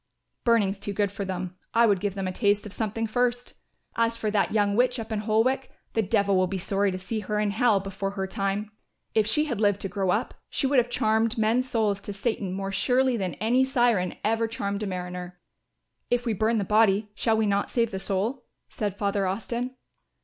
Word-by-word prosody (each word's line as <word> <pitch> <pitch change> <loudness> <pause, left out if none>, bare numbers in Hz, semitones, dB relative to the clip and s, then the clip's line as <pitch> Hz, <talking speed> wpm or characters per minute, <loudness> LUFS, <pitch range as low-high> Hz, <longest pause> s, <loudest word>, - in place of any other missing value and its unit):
"Burning's 210 -4 +2
too 200 0 -4
good 200 -1 0
for 200 0 -4
them; 185 -1 -4 0.2
I 235 0 +6
would 200 -4 +3
give 200 0 -2
them 195 -1 -2
a - - -1
taste 205 +2 +1
of 205 - -8
something 225 +1 -2
first. 245 +2 -1 0.4
As 230 0 +1
for 215 -2 -1
that 205 -1 +1
young 205 -2 +2
witch 250 +2 +3
up 225 0 -6
in 215 - 0
Holwick, 225 +5 +1 0.2
the 225 - +2
Devil 200 -1 +2
will 185 0 +3
be 190 +1 -3
sorry 195 +2 +1
to 185 - -3
see 215 +4 -3
her 210 +1 -2
in 210 -1 +1
Hell 220 -1 +3
before 195 0 -4
her 190 - 0
time. 195 +2 -2 0.4
If 215 -1 +3
she 300 +8 +2
had 240 -8 -3
lived 205 -2 +3
to 195 - -3
grow 195 -2 -1
up, 210 +6 0 0.2
she - - -1
would 270 -1 +4
have 245 0 0
charmed 220 0 +1
men's 230 +4 +2
souls 210 -4 +1
to 205 - -6
Satan 200 -2 -2
more 195 +1 -3
surely 250 +6 +2
than 190 -5 -2
any 240 +4 +2
siren 240 -8 +2
ever 225 +2 +1
charmed 200 -2 -3
a 210 - -2
mariner." 180 -1 -5 0.7
"If 245 0 +1
we 230 - +1
burn 220 +3 +1
the 205 - +1
body 210 0 +3
shall 220 +2 +1
we 220 - +2
not 200 0 +1
save 230 -2 +1
the 190 - -3
soul?" 215 +7 -2 0.2
said 205 -2 -3
Father 200 -1 0
Austin. 235 +6 -3
210 Hz, 215 wpm, -26 LUFS, 195-230 Hz, 0.7 s, I